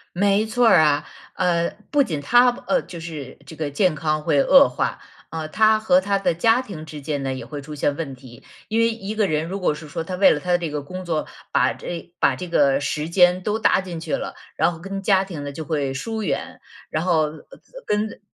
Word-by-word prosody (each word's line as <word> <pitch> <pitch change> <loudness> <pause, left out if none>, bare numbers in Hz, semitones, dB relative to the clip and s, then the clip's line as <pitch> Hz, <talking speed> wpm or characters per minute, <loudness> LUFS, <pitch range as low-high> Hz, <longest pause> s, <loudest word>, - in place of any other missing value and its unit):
没 200 +3 +2
错 240 +2 +2
儿 - - +7
啊， 150 -1 +2 0.3
呃 170 -2 +1 0.2
不 290 -1 +4
仅 160 - -3
他， 245 - +5 0.2
呃， 270 - +2
就 170 - -10
是 155 -5 -8
这 160 - -10
个 150 -2 -3
健 180 +2 +2
康 155 -1 -1
会 140 -2 +3
恶 275 0 +7
化， - - -2 0.3
呃， 160 -1 -4
他 215 +5 +4
和 200 -4 +4
他 200 +1 0
的 195 - +1
家 225 +8 +3
庭 160 -10 -9
之 150 -1 -8
间 145 -1 -3
呢 135 -1 -2
也 130 - -7
会 145 -2 -7
出 150 +2 -9
现 145 0 0
问 145 -4 -5
题， 125 -2 -14 0.3
因 225 +1 +1
为 230 - +4
一 215 -2 -5
个 215 -2 +2
人 155 0 0
如 195 +3 -5
果 155 - +1
是 150 0 -10
说 165 - -4
他 185 - -5
为 190 +1 +5
了 150 - +1
他 180 - -5
的 175 - +4
这 165 -3 -4
个 145 -1 -3
工 185 +5 -7
作， 160 -3 -2 0.3
把 - - +3
这 175 0 -7
把 - - +3
这 180 -1 -6
个 140 -4 +3
时 150 +2 -2
间 180 0 +4
都 210 +2 -1
搭 205 - +3
进 175 -3 -6
去 - - -3
了， - - -5 0.2
然 175 - +2
后 165 - -9
跟 195 +3 -6
家 195 -1 +3
庭 160 -7 -7
呢 145 - -5
就 155 +3 -6
会 145 -3 -1
疏 220 - -4
远， 180 - -3 0.3
然 155 +2 -2
后 160 -4 +2 0.6
跟 210 0 -1
170 Hz, 250 characters per minute, -22 LUFS, 150-200 Hz, 0.6 s, 儿